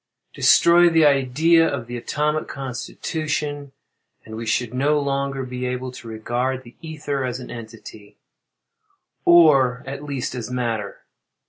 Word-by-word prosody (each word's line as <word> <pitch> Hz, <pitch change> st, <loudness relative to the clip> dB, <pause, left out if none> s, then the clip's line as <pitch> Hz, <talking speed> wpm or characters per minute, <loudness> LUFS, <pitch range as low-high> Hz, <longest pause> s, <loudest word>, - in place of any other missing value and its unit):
Destroy 175 Hz, +1 st, +5 dB
the 165 Hz, -2 st, +4 dB
idea 150 Hz, +4 st, +4 dB
of 130 Hz, -4 st, -4 dB
the 120 Hz, +1 st, -7 dB
atomic 150 Hz, +5 st, -2 dB
constitution 145 Hz, +2 st, -4 dB, 0.5 s
and 110 Hz, -, -9 dB
we 115 Hz, 0 st, -6 dB
should 120 Hz, +1 st, -1 dB
no 145 Hz, +4 st, +2 dB
longer 140 Hz, -1 st, -2 dB
be 125 Hz, 0 st, -4 dB
able 125 Hz, 0 st, -4 dB
to 125 Hz, -, -11 dB
regard 120 Hz, +4 st, -3 dB
the 120 Hz, -1 st, -15 dB
ether 150 Hz, -4 st, -4 dB
as 125 Hz, 0 st, -3 dB
an 125 Hz, -, -9 dB
entity, 110 Hz, -3 st, -11 dB, 1.1 s
or 140 Hz, -7 st, +5 dB
at 140 Hz, +1 st, -7 dB
least 140 Hz, -4 st, -4 dB
as 125 Hz, -2 st, -5 dB
matter. 115 Hz, -5 st, -3 dB
130 Hz, 135 wpm, -22 LUFS, 125-150 Hz, 1.1 s, Destroy